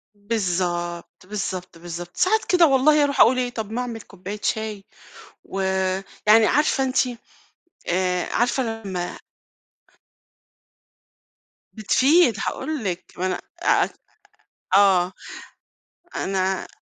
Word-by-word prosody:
بالضبط، 180 -5 -3
بالضبط، 185 -3 -5
بالضبط. 175 +1 -8
ساعات 435 +4 +2
كده 350 -3 +5
والله 290 +2 +4
أروح 285 -1 -1
أقُول 255 +2 +6
إيه، 250 -1 0
طَب 220 -3 -6
ما 245 +2 -2
أعمِل 235 -2 -5
كوباية 195 +2 -8
شاي 215 -2 -2 0.6
و 195 - -5 0.7
يعني 215 +1 +7
عارفة 290 -1 +2
أنتِ 260 0 -1 0.9
آآ، 180 0 0
عارفة 245 +2 +1 0.2
لمّا 180 -3 -4 2.6
بتفيد، 255 - +3
هاقول 310 -6 -3
لِك، 180 -3 -3
ما 185 - -1
أنا 185 -1 -1 0.2
أع - - +3 0.9
آه، 190 -3 +5 1.0
أنا 190 0 -1
205 Hz, 105 wpm, -23 LUFS, 185-255 Hz, 2.6 s, يعني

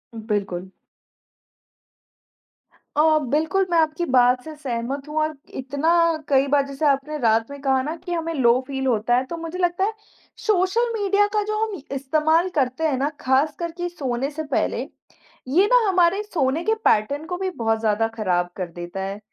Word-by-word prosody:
बिल्कुल। 200 -5 -3 2.3
अ, 310 +1 +4
बिल्कुल, 320 +7 +1
मैं 340 - +3
आपकी 315 +2 +1
बात 250 -3 +3
से 315 -1 -8
सहमत 270 0 -4
हूँ 300 +1 -6
और 310 0 -1 0.2
इतना 280 +4 -1 0.4
कई 275 0 +4
बार 280 -1 +4
जैसे 275 +2 -3
आपने 280 +2 0
रात 225 0 +2
में 280 - -8
कहा 265 -1 +2
ना 305 +4 -3
कि 355 - -5
हमें 330 -1 -2
लो 250 -4 +4
फ़ील 265 -1 -3
होता 240 0 +2
है 255 - +1
तो 335 +6 -6
मुझे 330 +2 -6
लगता 350 +1 +1
है 430 +2 0 0.5
सोशल 430 +4 +2
मीडिया 410 -1 +2
का 425 - +2
जो 430 +1 -2
हम 395 -9 -6
इस्तेमाल 315 +6 +2
करते 265 +1 0
हैं 275 - 0
ना 280 +3 0
ख़ासकर 300 +6 +1
कि 350 0 -2
सोने 270 -5 -3
से 315 +2 -5
पहले, 290 - -1 0.7
ये 350 +10 +4
ना 485 -4 +5
हमारे 370 +2 +3
सोने 315 -6 -1
के 440 - +2
पैटर्न 280 +9 +2
को 360 +1 -4
भी 380 0 -2
बहुत 225 0 +1
ज़्यादा 220 0 +1
ख़राब 180 -5 0
कर 185 -2 -3
देता 175 +2 -6
है 195 +1 -5
285 Hz, 175 wpm, -23 LUFS, 250-340 Hz, 2.3 s, ना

